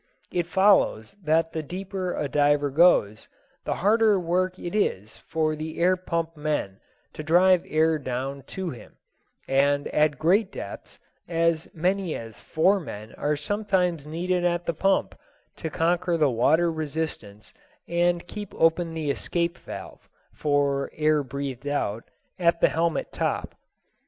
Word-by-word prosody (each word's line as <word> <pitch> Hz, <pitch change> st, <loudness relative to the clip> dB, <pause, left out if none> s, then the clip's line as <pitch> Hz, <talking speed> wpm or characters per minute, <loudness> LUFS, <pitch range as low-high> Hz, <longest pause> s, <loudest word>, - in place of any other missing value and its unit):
It 175 Hz, -1 st, -1 dB
follows 190 Hz, -, +3 dB
that 160 Hz, 0 st, +1 dB
the 160 Hz, -, -2 dB
deeper 185 Hz, +3 st, -4 dB
a -, -, -2 dB
diver 145 Hz, 0 st, +2 dB
goes, 135 Hz, -, +3 dB, 0.4 s
the -, -, -1 dB
harder 215 Hz, 0 st, +3 dB
work 185 Hz, +2 st, 0 dB
it 175 Hz, -, -6 dB
is 110 Hz, -, -1 dB
for 155 Hz, -1 st, -1 dB
the 155 Hz, +1 st, -6 dB
air 180 Hz, +2 st, +4 dB
pump 170 Hz, -2 st, -3 dB
men 150 Hz, -10 st, -2 dB, 0.3 s
to -, -, -6 dB
drive 175 Hz, +3 st, +4 dB
air 155 Hz, 0 st, +2 dB
down 135 Hz, +1 st, -4 dB
to 190 Hz, -3 st, -4 dB
him; 120 Hz, -, -12 dB, 0.5 s
and 140 Hz, +1 st, +2 dB
at 150 Hz, -2 st, +2 dB
great 190 Hz, -, +2 dB
depths -, -, -8 dB, 0.3 s
as 165 Hz, -1 st, +1 dB
many 180 Hz, +1 st, 0 dB
as 115 Hz, -2 st, -8 dB
four 190 Hz, +6 st, +2 dB
men 110 Hz, -, -8 dB
are 150 Hz, +1 st, -1 dB
sometimes 180 Hz, -2 st, -1 dB
needed 175 Hz, +3 st, -1 dB
at 175 Hz, 0 st, 0 dB
the 170 Hz, -, 0 dB
pump 195 Hz, +5 st, +1 dB, 0.4 s
to 160 Hz, -, -4 dB
conquer 170 Hz, +2 st, +1 dB
the 150 Hz, -4 st, +3 dB
water 160 Hz, +9 st, +3 dB
resistance 150 Hz, -10 st, -5 dB, 0.3 s
and 175 Hz, 0 st, +1 dB
keep 205 Hz, +2 st, -8 dB
open 165 Hz, 0 st, +2 dB
the 155 Hz, -3 st, -1 dB
escape 170 Hz, +4 st, -1 dB
valve -, -, -10 dB, 0.2 s
(for 140 Hz, -2 st, 0 dB
air 155 Hz, -1 st, +2 dB
breathed 140 Hz, 0 st, -5 dB
out) 115 Hz, -6 st, -2 dB, 0.3 s
at 170 Hz, -1 st, +3 dB
the -, -, +4 dB
helmet 165 Hz, 0 st, -1 dB
top. -, -, -2 dB
160 Hz, 145 wpm, -25 LUFS, 145-175 Hz, 0.5 s, air